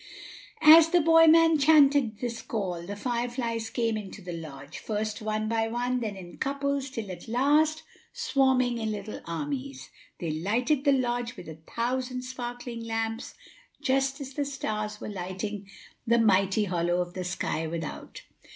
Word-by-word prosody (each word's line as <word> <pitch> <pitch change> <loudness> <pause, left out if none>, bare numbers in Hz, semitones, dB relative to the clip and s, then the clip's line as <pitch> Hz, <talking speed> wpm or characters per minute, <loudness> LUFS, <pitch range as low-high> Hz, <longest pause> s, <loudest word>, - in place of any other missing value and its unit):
= - - -21 0.2
As 325 0 +3
the 350 +1 +4
boy 325 0 +6
man 325 -1 +6
chanted 280 -6 +5
this 235 -2 -3
call, 180 -6 -4
the 205 - -4
fire 240 +3 -2
flies 230 -2 -3
came 230 -2 0
into 210 -1 -7
the 180 -2 -7
lodge, 145 -3 -8
first 215 0 -3
one 215 0 -2
by 225 0 0
one, 245 +2 -1
then 215 -4 -3
in 175 -2 -11
couples, 280 0 -1
till 225 -6 -5
at 180 - -9
last, 300 +6 +2 0.3
swarming 255 -3 +1
in 220 -1 -2
little 210 0 -6
armies, 140 -5 -5 0.3
they 165 -2 -2
lighted 240 - 0
the 285 - +5
lodge 245 -2 -1
with - - -10
a 160 0 -9 0.2
thousand 250 +1 -1
sparkling 245 -1 -6
lamps, 225 0 -3 0.4
just 270 +2 0
as 275 -1 -7
the 290 - -1
stars 215 -7 -4
were - - -6
lighting 195 +1 -5 0.4
the 235 +1 +4
mighty 195 -2 +3
hollow 175 -2 0
of 175 0 -3
the 185 - -4
sky 175 -2 -2
without. 165 -1 -6
230 Hz, 165 wpm, -27 LUFS, 195-260 Hz, 0.4 s, boy